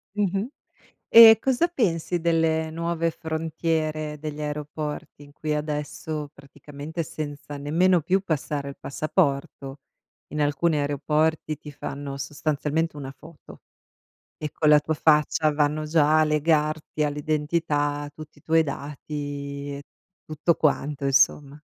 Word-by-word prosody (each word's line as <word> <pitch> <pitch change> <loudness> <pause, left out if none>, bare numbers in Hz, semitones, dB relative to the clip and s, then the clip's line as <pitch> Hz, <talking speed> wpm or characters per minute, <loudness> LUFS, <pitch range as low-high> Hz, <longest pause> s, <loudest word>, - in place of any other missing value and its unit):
Mh-mh. 200 +1 0 0.6
E 225 -1 +11
cosa 265 +6 +2
pensi 180 - 0
delle 160 -1 +1
nuove 165 +1 -1
frontiere 160 -1 -2
degli 150 0 -6
aeroporti, 150 0 -5
in 145 - -16
cui 150 +1 -3
adesso 150 0 -4
praticamente 145 +3 -8
senza 145 -2 -6
nemmeno 170 +5 +2
più 185 +6 +2
passare 150 -5 -3
il 140 - -10
passaporto, 140 -2 -1 0.5
in 150 - -5
alcuni 150 +2 +1
aeroporti 150 +2 0
ti 150 0 -10
fanno 140 0 -6
sostanzialmente 150 +3 -2
una 135 -2 -6
foto 155 +3 -15 0.8
e 150 -2 -5
con 155 - 0
la 150 -1 +7
tua 160 - -1
faccia 150 0 +3
vanno 150 +1 0
già 155 0 +3
a - - +5
legarti 155 0 0
all'identità, 150 0 -1
tutti 155 0 -12
i - - -26
tuoi 165 0 +3
dati 145 0 -6
e 140 - -10 0.4
tutto 155 +2 +1
quanto 145 -1 0
insomma? 140 +1 +3
150 Hz, 125 wpm, -25 LUFS, 145-160 Hz, 0.8 s, E